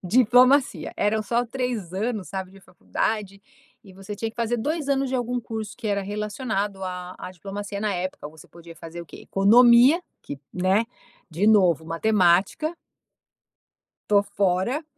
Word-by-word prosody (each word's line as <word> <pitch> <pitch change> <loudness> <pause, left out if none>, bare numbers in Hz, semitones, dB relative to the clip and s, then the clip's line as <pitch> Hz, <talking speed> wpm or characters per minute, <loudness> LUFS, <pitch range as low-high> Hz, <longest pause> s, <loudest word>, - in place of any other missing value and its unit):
Diplomacia. 250 +6 +3
Eram 215 +1 +1
só 235 +4 0
3 235 -7 -4
anos, 210 0 -3
sabe, 190 -1 -5
de 195 - -16
faculdade 200 +2 -4 0.4
e 190 - -14
você 195 +2 -8
tinha 225 +1 -3
que - - -31
fazer 235 0 0
2 295 +5 -2
anos 270 -1 +1
de - - -2
algum 245 0 -1
curso 220 -2 -6
que 240 - -7
era 200 -1 0
relacionado 205 -1 -3
à 180 0 -6
à - - -7
diplomacia 200 +2 -7
na 210 -2 0
época, 180 -4 -4
você 155 0 -16
podia 170 -1 -13
fazer 165 +2 -9
o - - -15
quê? - - -12
Economia, 240 - +5 0.2
que, 140 - -8
né, 190 +5 +2 0.4
de 180 +7 0
novo, 180 -7 +4
matemática 190 - +2 1.3
tô 205 -1 +4
fora, 200 - -1
205 Hz, 155 wpm, -24 LUFS, 185-235 Hz, 1.3 s, Economia